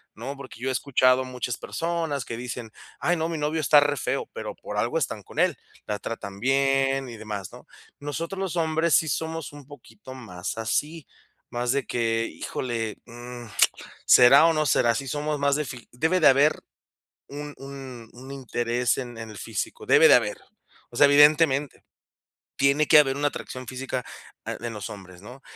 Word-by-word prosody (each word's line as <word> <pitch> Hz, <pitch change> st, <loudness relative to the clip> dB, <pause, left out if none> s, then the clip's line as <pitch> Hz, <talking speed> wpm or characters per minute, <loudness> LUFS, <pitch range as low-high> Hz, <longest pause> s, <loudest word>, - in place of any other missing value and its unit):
¿no?, 130 Hz, +6 st, -6 dB
porque 135 Hz, -4 st, -11 dB
yo 130 Hz, -, -4 dB
he -, -, +1 dB
escuchado 130 Hz, 0 st, +3 dB
muchas 125 Hz, -2 st, -4 dB
personas 165 Hz, -5 st, -3 dB
que 115 Hz, -, -5 dB
dicen: 120 Hz, -1 st, -6 dB, 0.3 s
"Ay, 175 Hz, -, +1 dB
no, 160 Hz, +1 st, -1 dB
mi 165 Hz, -, -3 dB
novio 150 Hz, +2 st, -1 dB
está 150 Hz, 0 st, +6 dB
re 145 Hz, 0 st, +1 dB
feo.", 135 Hz, -, -2 dB
pero -, -, -6 dB
por -, -, -7 dB
algo -, -, 0 dB
están -, -, -2 dB
con -, -, -8 dB
él, -, -, +3 dB, 0.3 s
la 105 Hz, -1 st, -3 dB
tratan 100 Hz, -4 st, -6 dB
bien 135 Hz, +1 st, +2 dB
y 120 Hz, -, -8 dB
demás, 105 Hz, -4 st, -6 dB
¿no? -, -, -13 dB, 0.3 s
Nosotros, 165 Hz, +6 st, -5 dB
los 190 Hz, -3 st, -3 dB
hombres 160 Hz, 0 st, +2 dB
sí 160 Hz, -, +3 dB
somos 160 Hz, 0 st, -3 dB
un 145 Hz, -1 st, -12 dB
poquito 130 Hz, -3 st, -13 dB
más 95 Hz, -7 st, -6 dB
así, 150 Hz, +7 st, -2 dB, 0.4 s
más 120 Hz, 0 st, -1 dB
de 140 Hz, -1 st, -1 dB
que: 115 Hz, -1 st, 0 dB
"Híjole, 115 Hz, -3 st, -4 dB
mm, 120 Hz, 0 st, -9 dB, 0.6 s
¿será 135 Hz, +5 st, +8 dB
o 165 Hz, -, +3 dB
no 155 Hz, -1 st, +1 dB
será?", 120 Hz, -3 st, +3 dB
sí 135 Hz, +4 st, -4 dB
somos 150 Hz, +2 st, -2 dB
más 140 Hz, 0 st, +2 dB
de 150 Hz, -, 0 dB
fi 120 Hz, -2 st, -9 dB
debe 160 Hz, +9 st, +1 dB
de 160 Hz, -, +6 dB
haber 140 Hz, +3 st, +4 dB, 0.7 s
un 145 Hz, +1 st, -7 dB
un 135 Hz, -4 st, -10 dB
un 130 Hz, +3 st, -12 dB
interés 120 Hz, -2 st, -1 dB
en 120 Hz, -3 st, -6 dB
en 110 Hz, -1 st, -7 dB
el 105 Hz, -, -10 dB
físico, -, -, -5 dB
debe -, -, +6 dB
de -, -, +8 dB
haber, -, -, +2 dB, 0.5 s
o 120 Hz, -, -12 dB
sea, 145 Hz, +3 st, +7 dB
evidentemente, 145 Hz, -1 st, +4 dB, 0.7 s
tiene 140 Hz, +2 st, +3 dB
que 150 Hz, -, +8 dB
haber 135 Hz, -2 st, +3 dB
una 145 Hz, 0 st, +1 dB
atracción 130 Hz, -2 st, -8 dB
física, 130 Hz, 0 st, -4 dB, 0.4 s
ah, -, -, -3 dB
en 120 Hz, -1 st, -4 dB
los 105 Hz, -2 st, -6 dB
hombres, 95 Hz, -3 st, -12 dB
¿no? 125 Hz, +6 st, -12 dB
135 Hz, 185 wpm, -25 LUFS, 120-145 Hz, 0.7 s, será